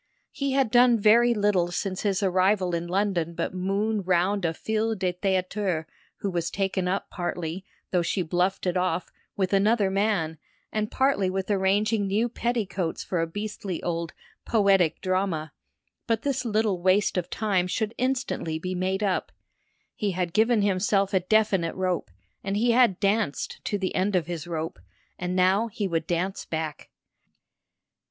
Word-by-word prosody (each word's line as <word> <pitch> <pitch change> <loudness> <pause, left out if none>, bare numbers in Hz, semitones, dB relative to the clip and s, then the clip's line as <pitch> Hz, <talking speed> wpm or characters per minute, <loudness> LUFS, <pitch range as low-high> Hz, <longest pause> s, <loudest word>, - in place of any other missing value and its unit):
He 275 -1 -2
had 265 -5 +2
done 245 -1 +6
very 230 +3 +5
little 205 -4 +2
since 185 +1 -3
his 200 -1 0
arrival 185 0 +2
in 170 0 -2
London 180 -3 0
but - - -2
moon 200 +3 0
round 185 +1 +1
a 165 - +2
fille 220 +3 -1
de 185 -2 -1
théâtre 185 -2 -1 0.4
who 200 - -1
was 170 -1 -1
taken 190 -2 -1
up 190 +2 -2
partly, 175 0 -4 0.3
though 180 - +2
she 180 +2 -1
bluffed 180 +4 0
it 180 -1 0
off, 180 -1 -1 0.3
with 190 -1 0
another 200 0 +3
man, 190 -6 0 0.3
and 215 0 -1
partly 265 -8 +2
with 190 +2 -2
arranging 205 +2 +2
new 210 +5 +1
petticoats 210 -8 -2
for 175 -3 -1
a 165 - 0
beastly 205 0 -5
old 170 -1 -2 0.3
"poetic 195 -7 +3
drama"; 185 -4 -1 0.5
but 225 -1 0
this 270 -2 -1
little 215 -4 +1
waste 190 +3 +3
of 180 -2 -2
time 195 -5 0
should 220 +4 -2
instantly 255 -11 -1
be 185 +3 -4
made 190 +2 -1
up. 195 -3 0 0.6
He 205 -3 -2
had 175 -2 -2
given 220 0 +3
himself 195 0 +1
a 190 - +4
definite 195 -3 +1
rope, 185 - -1 0.3
and 195 +1 -1
he 235 +3 +3
had 235 -6 +4
danced 200 -6 -1
to 205 - 0
the 190 -2 -2
end 190 +2 +1
of 175 -4 +2
his 170 -1 -5
rope, 165 -1 -4 0.4
and 180 +1 -2
now 190 +5 +3
he 205 -2 -3
would 165 -3 -2
dance 180 +3 -1
back. 160 -2 -5
190 Hz, 160 wpm, -26 LUFS, 180-210 Hz, 0.6 s, done